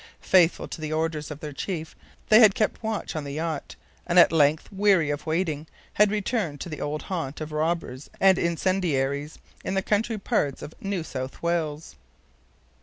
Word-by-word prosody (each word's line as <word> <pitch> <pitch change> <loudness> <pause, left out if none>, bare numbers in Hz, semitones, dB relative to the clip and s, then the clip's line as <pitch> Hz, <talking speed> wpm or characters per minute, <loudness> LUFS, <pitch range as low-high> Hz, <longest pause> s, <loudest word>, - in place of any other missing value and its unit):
Faithful 180 -3 +3
to 160 - -8
the 155 0 -4
orders 155 -1 -1
of 150 -1 -8
their 150 -2 -6
chief, 160 +2 -5 0.3
they 215 - +8
had 215 -4 +7
kept 215 - 0
watch 220 -5 -3
on 155 - -2
the 140 -1 -6
yacht, 160 0 -4 0.3
and 175 0 +1
at 175 - +8
length, 155 -1 +3
weary 190 -6 +3
of 145 +2 -5
waiting, 160 -2 -1 0.3
had 210 0 +4
returned 205 - -1
to 175 - -6
the 155 - -6
old 150 +1 -3
haunt 160 -7 -4
of 155 0 -6
robbers 155 -3 -2
and 190 -2 +5
incendiaries 160 -5 0 0.3
in 190 - -2
the 190 - +1
country 215 +2 0
parts 145 -8 -1
of 155 - -8
New 195 -4 -2
South 130 -2 -6
Wales. 160 - -2
160 Hz, 180 wpm, -26 LUFS, 150-190 Hz, 0.3 s, they